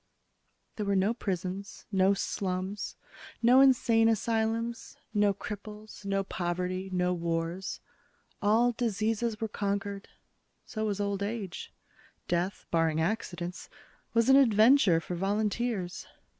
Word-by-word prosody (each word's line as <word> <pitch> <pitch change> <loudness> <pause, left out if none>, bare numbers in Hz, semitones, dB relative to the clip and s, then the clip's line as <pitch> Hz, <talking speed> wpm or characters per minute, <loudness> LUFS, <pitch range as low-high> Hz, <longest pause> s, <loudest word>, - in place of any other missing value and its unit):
There 210 - -2
were 200 - +2
no 195 +4 +2
prisons, 190 -2 -4
no 190 0 +4
slums, 190 0 -3 0.5
no 250 +3 +7
insane 235 -4 +5
asylums, 225 +1 -1 0.2
no 205 -1 +4
cripples, 210 +1 -8
no 195 0 0
poverty, 185 +1 -3
no 180 0 +1
wars. 170 +2 -3 0.6
All 225 +4 +4
diseases 225 -1 -1
were 225 - -1
conquered. 200 -1 -3 0.6
So 220 -1 -3
was 205 -1 -2
old 200 -1 -1
age. 200 -3 -4 0.6
Death, 180 +3 -1
barring 165 -1 +2
accidents, 175 -1 -3 0.5
was 230 0 +4
an 270 0 +7
adventure 220 -6 +5
for 180 - -6
volunteers. 200 0 -1
200 Hz, 115 wpm, -29 LUFS, 185-225 Hz, 0.6 s, no